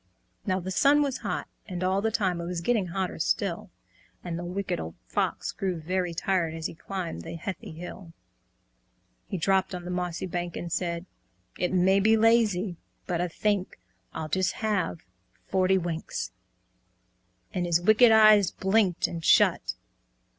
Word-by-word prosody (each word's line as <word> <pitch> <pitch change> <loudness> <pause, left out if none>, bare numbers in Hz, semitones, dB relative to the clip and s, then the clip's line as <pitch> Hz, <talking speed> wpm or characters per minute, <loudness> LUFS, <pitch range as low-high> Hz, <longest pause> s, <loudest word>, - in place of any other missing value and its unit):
Now 185 -1 +1
the 190 +1 -5
sun 290 +7 +4
was 275 -3 -2
hot, - - -3 0.2
and 180 -3 -4
all 190 +2 +1
the 225 - +1
time 190 -6 0
It 170 - -5
was 175 -1 -3
getting 210 0 +1
hotter 185 0 -3
still; 180 +2 -1 0.5
And 175 -2 -4
the - - -5
Wicked 185 - -3
Old 80 0 -6
Fox - - -1
grew 185 -3 -3
very 180 +2 -1
tired 170 -1 0
As 160 -1 -6
he - - -2
climbed 170 - -5
the 85 - -7
heathy 175 +2 -6
hill. 175 +1 -9 1.2
He - - -3
dropped 190 +2 +1
on 180 0 -5
mossy 180 -1 -2
bank, 175 -1 -4
and 170 - -5
said 170 0 -2 0.5
"It 180 - 0
may 190 +1 +4
be 220 +3 +4
lazy 215 -5 +3 0.3
but 175 -1 -1
I 180 - 0
think 200 +2 -1 0.3
I'll 155 - -5
just 185 +4 0
have 205 -6 -1 0.4
forty 190 0 +2
winks," 170 -2 -3 1.2
And 180 -3 -1
his 170 -1 +3
wicked 215 +6 +6
eyes 215 -3 +7
blinked 190 -2 +1
and 165 -1 -6
shut. - - +4
185 Hz, 160 wpm, -27 LUFS, 170-200 Hz, 1.2 s, eyes